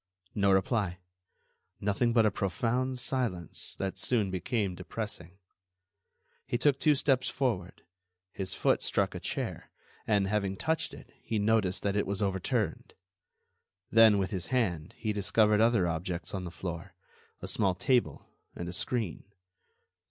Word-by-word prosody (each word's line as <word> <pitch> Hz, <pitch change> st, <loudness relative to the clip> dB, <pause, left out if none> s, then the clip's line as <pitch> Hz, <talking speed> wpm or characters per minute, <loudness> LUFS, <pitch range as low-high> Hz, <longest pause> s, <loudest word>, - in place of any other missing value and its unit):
No 100 Hz, -1 st, +3 dB
reply. 95 Hz, -1 st, +1 dB, 0.8 s
Nothing 105 Hz, +4 st, +1 dB
but 115 Hz, -2 st, +4 dB
a 105 Hz, -, +3 dB
profound 120 Hz, +8 st, -1 dB
silence 120 Hz, -, -1 dB
that 95 Hz, -1 st, -3 dB
soon 110 Hz, -6 st, +1 dB
became 95 Hz, +2 st, -1 dB
depressing. 95 Hz, -2 st, -6 dB, 1.1 s
He 120 Hz, -, 0 dB
took 140 Hz, +1 st, +2 dB
two 150 Hz, -2 st, +4 dB
steps 135 Hz, -2 st, +2 dB
forward; 110 Hz, -10 st, -2 dB, 0.5 s
his 95 Hz, -1 st, -3 dB
foot -, -, +2 dB
struck -, -, +1 dB
a -, -, -5 dB
chair, -, -, -4 dB, 0.4 s
and, 100 Hz, -3 st, +3 dB
having 100 Hz, -2 st, -1 dB
touched 160 Hz, +8 st, -1 dB
it, -, -, -14 dB
he 110 Hz, -, -2 dB
noticed 105 Hz, -3 st, +1 dB
that 100 Hz, 0 st, 0 dB
it 105 Hz, -, +1 dB
was 100 Hz, 0 st, -2 dB
overturned. 95 Hz, -3 st, -1 dB, 1.0 s
Then, 110 Hz, -2 st, +7 dB
with 95 Hz, -1 st, -1 dB
his 95 Hz, -3 st, -3 dB
hand, 90 Hz, -11 st, -1 dB
he 110 Hz, -1 st, -1 dB
discovered 105 Hz, +1 st, +3 dB
other 115 Hz, -6 st, +4 dB
objects 85 Hz, +1 st, -3 dB
on 95 Hz, -2 st, -3 dB
the -, -, -4 dB
floor—a 85 Hz, +1 st, -9 dB
small 95 Hz, -3 st, +1 dB
table 125 Hz, +6 st, +1 dB, 0.3 s
and 85 Hz, -, -5 dB
a 90 Hz, -, -5 dB
screen. 110 Hz, -2 st, -1 dB
100 Hz, 140 wpm, -30 LUFS, 95-115 Hz, 1.1 s, Then